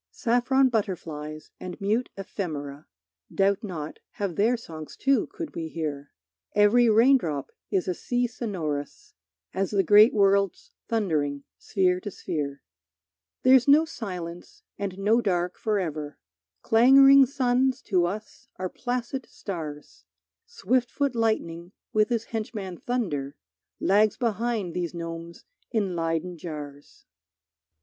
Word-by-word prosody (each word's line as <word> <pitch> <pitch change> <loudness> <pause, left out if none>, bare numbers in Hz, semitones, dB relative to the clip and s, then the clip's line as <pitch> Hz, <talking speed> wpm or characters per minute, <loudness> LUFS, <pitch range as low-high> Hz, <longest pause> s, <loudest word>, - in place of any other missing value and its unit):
Saffron 255 +2 +2
butterflies 160 -9 -4
and 180 -1 -7
mute 215 +5 0
ephemera, 155 -7 -5 0.4
Doubt 195 +1 +1
not, 160 -7 -6
have 195 -5 -3
their 230 +5 +2
songs 160 -8 -10
too, 275 -4 +2
could 330 -4 -7
we 165 -1 -3
hear. 150 -3 -4 0.5
Every 220 +4 +5
raindrop 220 - +3 0.2
is 190 -2 0
a 180 - +1
sea 245 +7 -1
sonorous 170 - -4 0.4
As 195 0 -1
the 200 -2 +2
great 210 +5 +7
worlds 200 -3 +2 0.2
thundering 150 -11 -1 0.2
sphere 185 -3 +1
to 205 - -6
sphere. 145 -7 -4 0.8
There's 255 0 +6
no 300 +3 +6
silence 180 - -7
and 195 -2 -4
no 215 +4 +3
dark 180 -4 -1
forever, 160 -9 -2 0.5
Clangoring 270 +4 +7
suns 260 0 +1
to 180 -4 +2
us 210 +3 -7
are 185 0 -4
placid 250 +2 -4
stars; 155 -7 -7 0.4
Swift 255 - 0
foot 280 -2 -1
lightning 185 -6 -1 0.2
with 215 +1 +3
his 230 -2 0
henchman 215 -5 -5
thunder 160 - -2 0.4
Lags 210 +2 +3
behind 225 -5 -1
these 175 -1 -3
gnomes 165 0 -7 0.2
in 200 -6 -1
Leyden 165 +1 -2
jars. 145 -3 -9
195 Hz, 120 wpm, -26 LUFS, 165-235 Hz, 0.8 s, great